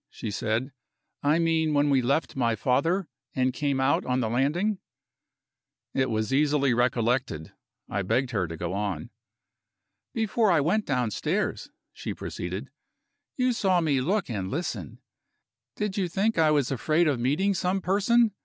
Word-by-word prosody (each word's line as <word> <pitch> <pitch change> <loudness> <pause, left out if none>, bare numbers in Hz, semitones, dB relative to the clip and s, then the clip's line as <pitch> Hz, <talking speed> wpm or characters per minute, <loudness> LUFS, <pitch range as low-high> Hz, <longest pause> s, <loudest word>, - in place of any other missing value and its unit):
she 110 - -6
said. 110 +6 -1 0.5
"I 145 +3 +3
mean 160 -2 +2
when 145 0 +3
we 135 -2 +4
left 140 +6 0
my 120 -4 +1
father, 160 - +1 0.3
and 130 0 +1
came 140 0 0
out 135 +2 +2
on 125 0 0
the 115 -3 0
landing." 170 - +1 1.1
It 130 -1 +1
was 110 +1 -1
easily 140 -2 +3
recollected; 120 - 0 0.3
I 100 - -2
begged 120 +7 0
her 100 -7 0
to 80 0 -7
go 85 +2 -3
on. 100 -1 -3 1.0
"Before 220 0 +1
I 170 -4 +4
went 190 +9 +1
downstairs," 150 - -1 0.2
she - - -5
proceeded, - - -5 0.7
"you 250 -1 +2
saw 190 -5 +2
me 145 -6 +1
look 190 +7 0
and 100 -6 -3
listen. 165 - -4 0.8
Did 210 -2 -2
you 190 -3 +1
think 200 +6 +1
I 160 -1 +5
was 145 -3 +2
afraid 155 +6 +2
of 140 -5 +1
meeting 150 +12 +1
some 185 +1 0
person? 210 +4 +3
145 Hz, 155 wpm, -27 LUFS, 125-180 Hz, 1.1 s, I